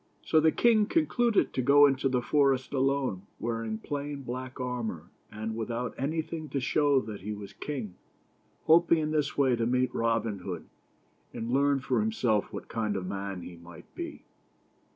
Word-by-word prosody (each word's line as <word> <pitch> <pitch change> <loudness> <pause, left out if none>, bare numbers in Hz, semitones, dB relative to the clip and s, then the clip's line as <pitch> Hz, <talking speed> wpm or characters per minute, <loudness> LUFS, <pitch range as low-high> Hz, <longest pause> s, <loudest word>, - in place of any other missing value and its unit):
So 160 - +3
the 160 0 +4
king 220 0 +4
concluded 240 - +2
to 130 - 0
go 145 +3 +7
into 135 -1 +2
the 125 -2 0
forest 135 -3 +2
alone, 135 -8 0
wearing 115 -1 -2
plain 145 +3 -5
black 130 +1 -6
armor, 115 -9 -4 0.2
and 110 +1 -4
without 115 +2 -3
anything 155 +2 -3
to 140 - -1
show 145 +1 +3
that 105 -4 -7
he 105 +3 -5
was 100 -1 -9
king; 125 -10 -5 0.7
hoping 170 +1 +5
in 155 -1 -1
this 150 -2 0
way 135 -3 +4
to 115 -1 0
meet 125 +1 +1
Robin 115 -3 0
Hood, 90 -2 -6 0.7
and 115 +1 -4
learn 140 +1 +3
for - - 0
himself 130 - +1
what - - -7
kind 110 -2 -2
of 95 -2 -3
a - - -5
man 100 -2 -4
he 85 - -9
might 85 -1 -14
be. - - -7
130 Hz, 175 wpm, -29 LUFS, 110-145 Hz, 0.7 s, go